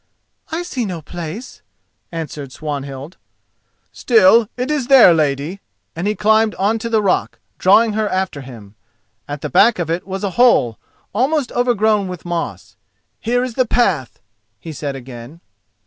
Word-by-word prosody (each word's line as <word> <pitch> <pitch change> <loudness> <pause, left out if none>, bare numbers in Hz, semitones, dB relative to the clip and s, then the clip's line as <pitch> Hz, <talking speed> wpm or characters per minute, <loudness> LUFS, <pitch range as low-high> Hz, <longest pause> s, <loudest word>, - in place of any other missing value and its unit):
"I 330 +2 -2
see 275 -8 -3
no 180 -6 -5
place," 175 - -8 0.5
answered 150 -5 -6
Swanhild. 140 +1 -6 0.7
"Still, 225 -1 +4
it 250 +4 -2
is 280 -5 -1
there, 260 -10 +8
lady," 150 +3 -1 0.4
and 170 +5 -3
he 210 - 0
climbed 220 +1 +2
on 210 +4 0
to 230 - -4
the 220 -2 +2
rock, 190 - 0 0.2
drawing 215 +4 +4
her 215 -1 0
after 185 -6 -2
him. 115 -6 -12 0.5
At 145 0 -6
the - - -4
back 205 +6 +5
of 170 -2 -2
it 175 +3 -3
was 190 +1 -5
a 200 - -1
hole, 120 - +4 0.3
almost 265 +5 0
overgrown 220 -4 +1
with 180 -2 -8
moss. 175 -1 -4 0.4
"Here 245 +2 0
is 255 -2 -4
the 255 +1 +1
path," 185 - 0 0.4
he 160 - -8
said 140 -2 -4
again. 125 +3 -10
190 Hz, 155 wpm, -18 LUFS, 155-230 Hz, 0.7 s, there